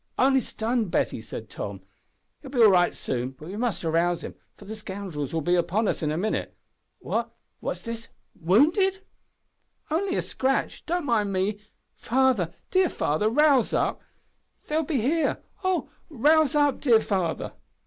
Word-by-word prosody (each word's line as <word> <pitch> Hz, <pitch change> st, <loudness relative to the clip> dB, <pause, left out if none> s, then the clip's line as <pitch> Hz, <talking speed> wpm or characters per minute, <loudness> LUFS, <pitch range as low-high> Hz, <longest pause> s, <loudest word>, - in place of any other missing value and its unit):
"Only 265 Hz, +1 st, +4 dB
stunned, 225 Hz, -1 st, -2 dB
Betty," 120 Hz, -, 0 dB
said 110 Hz, 0 st, -8 dB
Tom; 100 Hz, -2 st, -6 dB, 0.6 s
"will 275 Hz, -, -10 dB
be 250 Hz, -3 st, +3 dB
all 215 Hz, -, +8 dB
right 175 Hz, -1 st, +3 dB
soon, 130 Hz, +1 st, -3 dB
but 155 Hz, -, -11 dB
we 195 Hz, -, -6 dB
must 230 Hz, -3 st, -2 dB
rouse 170 Hz, +1 st, +1 dB
him, -, -, -6 dB, 0.2 s
for 205 Hz, -, -13 dB
the 215 Hz, +2 st, -6 dB
scoundrels 190 Hz, -9 st, -5 dB
will 165 Hz, -, -1 dB
be 175 Hz, -, +2 dB
upon 185 Hz, +5 st, +1 dB
us -, -, -1 dB
in 155 Hz, -, 0 dB
a 155 Hz, -, -1 dB
minute. 215 Hz, +5 st, -2 dB, 0.4 s
What -, -, -2 dB, 0.3 s
what's -, -, -4 dB
this 230 Hz, -1 st, -6 dB, 0.3 s
wounded?" 315 Hz, -, +3 dB, 0.9 s
"Only 370 Hz, +4 st, 0 dB
a -, -, 0 dB
scratch. 265 Hz, +1 st, -1 dB
Don't 345 Hz, -1 st, -1 dB
mind 215 Hz, -6 st, +1 dB
me. 195 Hz, +2 st, -1 dB, 0.3 s
Father! 245 Hz, -8 st, +1 dB, 0.2 s
dear 370 Hz, -2 st, +3 dB
father 155 Hz, +9 st, 0 dB
rouse 280 Hz, 0 st, +4 dB
up! -, -, 0 dB, 0.7 s
They 300 Hz, -, -2 dB
will 320 Hz, -, +2 dB
be 275 Hz, -5 st, 0 dB
here 310 Hz, +7 st, 0 dB, 0.2 s
oh! 370 Hz, -1 st, 0 dB, 0.2 s
rouse 305 Hz, +2 st, +3 dB
up, 290 Hz, -2 st, +2 dB
dear 235 Hz, -6 st, +5 dB
father!" 185 Hz, -6 st, -2 dB
220 Hz, 165 wpm, -26 LUFS, 175-285 Hz, 0.9 s, all